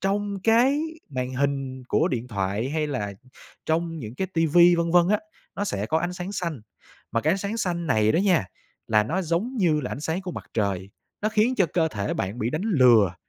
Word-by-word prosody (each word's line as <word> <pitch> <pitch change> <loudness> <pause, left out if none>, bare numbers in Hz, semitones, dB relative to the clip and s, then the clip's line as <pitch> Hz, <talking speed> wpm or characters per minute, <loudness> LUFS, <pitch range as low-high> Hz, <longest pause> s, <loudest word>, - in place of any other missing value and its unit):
Trong 200 +1 -1
cái 250 +6 +4 0.3
màn 130 -1 -3
hình 135 -2 -2
của - - +2
điện 125 -1 -3
thoại 100 +3 -2
hay 155 0 0
là 105 -9 -3 0.5
trong 165 0 -1
những 115 -3 -7
cái 190 - -2
TV 165 -2 +1 0.2
vân 170 0 0
vân 175 0 +5
á, 210 +1 +2 0.4
nó 205 - -1
sẽ 100 - -2
có 160 +7 +1
ánh 175 +2 -2
sáng 180 +2 -6
xanh, 170 - -3 0.5
mà 115 - +1
cái 155 - +2
ánh 195 - 0
sáng 200 +3 -3
xanh 175 -5 -2
này 110 -6 +3
đó - - +2
nha, 185 - +3 0.4
là 110 -1 +4
nó 180 - -1
giống 185 +10 -1
như 160 -6 +3
là 125 - -4
ánh - - -5
sáng 160 +4 -2
của 180 -2 -5
mặt - - -7
trời, 100 -3 -1 0.3
nó 215 - +2
khiến 220 +4 +2
cho 190 -4 +3
cơ 160 +1 +1
thể 100 -5 -3
bạn 100 +5 -3
bị 115 +1 -1
đánh 155 +7 -2
lừa 125 - +5
160 Hz, 220 wpm, -25 LUFS, 120-190 Hz, 0.5 s, vân